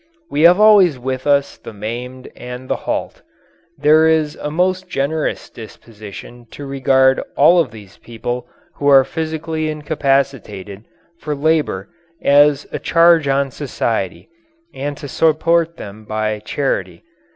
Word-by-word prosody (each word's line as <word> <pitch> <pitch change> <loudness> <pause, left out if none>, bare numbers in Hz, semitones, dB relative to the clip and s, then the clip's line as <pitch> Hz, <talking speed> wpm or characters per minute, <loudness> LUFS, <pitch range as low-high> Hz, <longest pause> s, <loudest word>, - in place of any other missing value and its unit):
We 145 - 0
have 180 +3 +2
always 205 -8 +6
with 130 +2 -4
us 140 -1 +1
the - - -10
maimed 120 +5 -7
and 125 +1 -9
the - - 0
halt. - - -3 0.6
There 155 +2 +4
is 155 -1 +1
a 150 - -4
most 185 +3 -1
generous 155 +2 -2
disposition 110 +1 -12
to 145 - -9
regard 130 -1 +2 0.2
all 170 +5 +6
of 160 -7 +1
these 105 -3 -14
people 120 +1 -6 0.3
who 145 - -2
are 135 -2 +7
physically 160 +1 -4
incapacitated 135 - -2 0.3
for 150 -1 -4
labour 150 -10 0 0.3
as 145 0 +4
a - - -4
charge 165 -2 +4
on 135 0 0
society 115 -8 -3 0.5
and 145 +1 -5
to 145 - -8
support 165 +3 +1
them 105 +2 -10
by 110 0 -2
charity. 100 -7 -3
140 Hz, 135 wpm, -18 LUFS, 120-155 Hz, 0.6 s, are